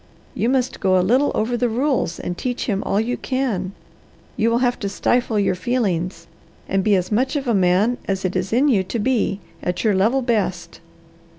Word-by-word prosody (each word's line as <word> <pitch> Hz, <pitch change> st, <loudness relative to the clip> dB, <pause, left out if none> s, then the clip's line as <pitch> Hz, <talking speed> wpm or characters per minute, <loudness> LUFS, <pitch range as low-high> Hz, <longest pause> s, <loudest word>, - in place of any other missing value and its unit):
You 230 Hz, -, 0 dB
must 255 Hz, -1 st, 0 dB
go 185 Hz, -2 st, +3 dB
a 180 Hz, -, +2 dB
little 255 Hz, +8 st, +3 dB
over 235 Hz, +3 st, 0 dB
the 245 Hz, 0 st, +1 dB
rules, 250 Hz, -, 0 dB
and 175 Hz, -, -4 dB
teach 245 Hz, +5 st, -3 dB
him 200 Hz, -4 st, -1 dB
all 200 Hz, -, 0 dB
you 240 Hz, +3 st, -1 dB
can. 225 Hz, -9 st, -2 dB, 0.6 s
You 225 Hz, -, +2 dB
will 230 Hz, -, +2 dB
have 245 Hz, 0 st, +1 dB
to 200 Hz, -, -2 dB
stifle 240 Hz, +2 st, 0 dB
your 200 Hz, -2 st, +2 dB
feelings, 180 Hz, -5 st, -2 dB, 0.4 s
and 195 Hz, 0 st, 0 dB
be 210 Hz, 0 st, +3 dB
as 185 Hz, +1 st, -1 dB
much 255 Hz, +7 st, +1 dB
of 280 Hz, -2 st, -2 dB
a 235 Hz, -, +2 dB
man 195 Hz, +5 st, +2 dB
as 195 Hz, -1 st, -1 dB
it 185 Hz, -, -2 dB
is 185 Hz, +1 st, -1 dB
in 255 Hz, +6 st, +3 dB
you 225 Hz, -9 st, +3 dB
to 190 Hz, +5 st, -4 dB
be, 215 Hz, -3 st, 0 dB, 0.2 s
at 180 Hz, 0 st, -2 dB
your 215 Hz, -2 st, +3 dB
level 225 Hz, +8 st, +2 dB
best." 190 Hz, -8 st, -1 dB
215 Hz, 205 wpm, -21 LUFS, 190-245 Hz, 0.6 s, go